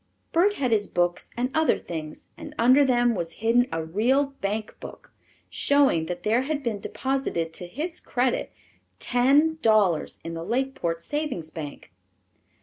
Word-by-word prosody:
Bert 390 +5 +3
had 255 - -1
his 210 -2 +2
books 175 0 -1
and 250 +2 -1
other 315 -1 +3
things, 155 -2 -7
and 300 -1 -10
under 255 +5 +6
them 240 -2 +3
was 170 -5 -3
hidden 230 +5 +2
a 165 0 -2
real 230 - +2 0.2
bank 210 +2 -3
book, - - -11 0.4
showing 275 - +2
that 175 0 -5
there 225 +4 +2
had 290 +1 -3
been 225 -5 -2
deposited 250 -10 -2
to 180 - -5
his 320 - -5
credit 250 0 -1 0.5
ten 285 +6 +3
dollars 205 -8 +2
in 165 - -5
the 165 0 -5
Lakeport 235 -8 -2
Savings 260 - -3
Bank. 150 -3 -8
235 Hz, 150 wpm, -25 LUFS, 175-270 Hz, 0.5 s, under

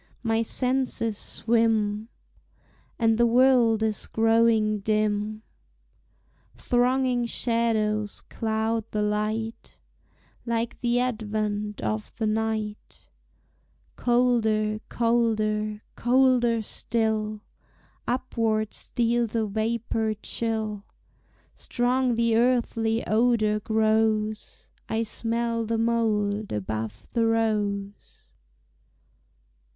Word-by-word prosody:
my 225 -1 +1
senses 250 -2 0
swim. 220 -1 0 0.9
And 225 -1 +2
the 235 - +5
world 240 -2 +4
is 220 -1 -1
growing 225 -1 +3
dim; 215 +1 -1 1.1
Thronging 250 0 +1
shadows 220 -3 0
cloud 220 0 -2
the 210 -1 -1
light, 215 +2 -3 0.6
Like 230 0 -2
the 240 0 +2
advent 215 -3 -2
of 110 -1 -3
the 225 - -2
night, 215 -1 -3 0.9
Colder, 220 -3 +2
colder, 215 -2 0
colder 245 -2 +3
still, 215 -1 -1 0.7
Upward 225 -4 -1
steals 235 -1 -1
a 225 -1 +1
vapor 220 +1 -1
chill; 220 -3 -2 0.7
Strong 250 0 0
the 230 -1 +2
earthly 230 -2 +1
odor 215 -1 +2
grows, 220 0 0 0.2
I 225 +1 0
smell 230 +1 -2
the 230 0 0
mold 215 -3 0
above 110 +1 -4
the 230 -1 +2
rose! 210 -3 -2
225 Hz, 85 wpm, -26 LUFS, 215-235 Hz, 1.1 s, the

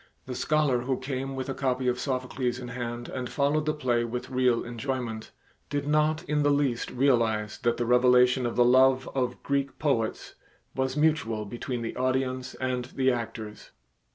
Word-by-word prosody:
The 130 - -5
scholar 150 -2 +1
who 130 +1 -1
came 135 0 -4
with 130 0 -4
a 135 - -2
copy 130 -1 -1
of 125 0 +1
Sophocles 130 -2 -2
in 125 -1 -7
hand 120 -1 -5
and 125 -2 -5
followed 150 +2 +1
the 155 - +2
play 125 -5 +1
with 120 +2 -5
real 125 -2 +2
enjoyment, 120 -2 -4 0.4
did 145 0 -2
not 155 +1 +2
in 150 0 0
the 145 - +3
least 140 -4 +1
realize 115 -5 +1
that 120 -1 +1
the 120 - -1
revelation 125 +1 +4
of 120 - -4
the 120 - +5
love 130 +1 +5
of 130 -2 -2
Greek 140 -1 -1
poets 120 -7 -1 0.4
was 130 +1 -1
mutual 150 -9 +1
between 120 +3 -4
the 115 - -4
audience 130 0 -1
and 125 -1 -2
the 130 +1 +1
actors. 110 -3 -5
130 Hz, 175 wpm, -27 LUFS, 120-135 Hz, 0.4 s, the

